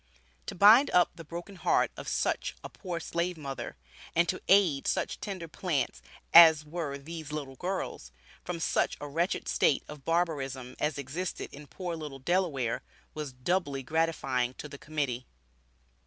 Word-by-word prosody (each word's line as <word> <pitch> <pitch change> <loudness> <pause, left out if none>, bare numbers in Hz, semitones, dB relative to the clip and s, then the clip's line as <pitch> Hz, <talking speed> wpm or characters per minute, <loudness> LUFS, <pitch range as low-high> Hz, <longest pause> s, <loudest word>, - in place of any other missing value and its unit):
To - - -4
bind 215 +9 +8
up 180 -1 +4
the 165 - -10
broken 170 +5 -8
heart - - +2
of - - -8
such - - -1
a - - -6
poor 180 -4 -5
slave 170 +1 -2
mother, 140 -3 -6 0.4
and 170 +1 +4
to 185 - -1
aid 185 -8 +4
such - - -1
tender 190 -5 -5
plants 155 -5 -2 0.3
as 160 -3 +9
were 150 -3 -4
these 155 +1 -8
little 140 -3 -5
girls, 180 - -4 0.3
from 180 -1 -4
such - - +1
a 145 - -6
wretched 170 +6 -1
state 140 - +2
of 150 -2 -10
barbarism 135 -6 -1
as 150 0 0
existed 145 +7 -4
in 145 +1 -10
poor 175 +3 -5
little 150 -4 -7
Delaware, 140 -6 0 0.3
was 150 -3 -5
doubly 140 +1 -1
gratifying 135 -5 0
to 150 - -7
the 140 -1 -10
Committee. 140 -5 -3
155 Hz, 155 wpm, -30 LUFS, 140-175 Hz, 0.4 s, as